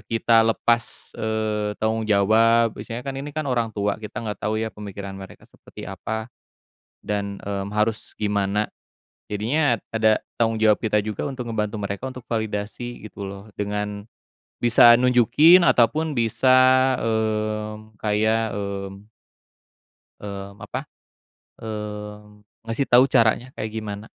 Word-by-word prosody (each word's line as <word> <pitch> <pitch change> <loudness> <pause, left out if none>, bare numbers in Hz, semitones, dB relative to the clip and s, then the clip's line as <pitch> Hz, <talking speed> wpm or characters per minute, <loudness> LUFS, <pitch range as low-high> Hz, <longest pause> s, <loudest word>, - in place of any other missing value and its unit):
kita 115 0 +4
lepas, 115 +1 -1
eee, 110 -1 -1
tanggung 110 0 -1
jawab 110 +3 +4
biasanya 115 +3 -7
kan 135 0 -4
ini 145 +2 -7
kan 155 - -1
orang 120 -2 +1
tua 100 +1 -1
kita 110 +1 -7
nggak 105 -1 -5
tau 110 - 0
ya 110 0 -2
pemikiran 100 -1 -8
mereka 95 - -12
seperti - - -14
apa 110 +2 -5 0.7
dan, 100 -1 -3
mmm, 100 0 -4
harus 105 +1 -1
gimana, 105 0 0 0.6
jadinya 120 +7 +1 0.2
ada 110 -1 +3 0.2
tanggung 115 -1 +2
jawab 110 -1 +4
kita 105 -2 +1
juga 105 -1 -3
untuk 135 -3 -5
ngebantu 105 -1 -2
mereka 100 +2 -4
untuk 125 -2 -9
validasi 110 +2 -4
gitu 100 -2 -7
loh 100 +2 -10
dengan 105 0 -3 0.6
bisa 120 0 +7
nunjukin 125 +8 +6
ataupun 155 +6 +3
bisa, 120 +3 +3 0.5
mmm, 110 -1 -2
kayak, 110 +1 +1
mmm 100 +1 -6 1.1
mmm, 100 0 -8
apa, - - -5 0.8
mmm, 105 -1 -7 0.2
ngasih 115 +4 -1
tau 125 +2 +7
caranya 120 +1 +2
kayak 110 0 -5
gimana. 105 -1 -6
110 Hz, 130 wpm, -23 LUFS, 105-115 Hz, 1.1 s, bisa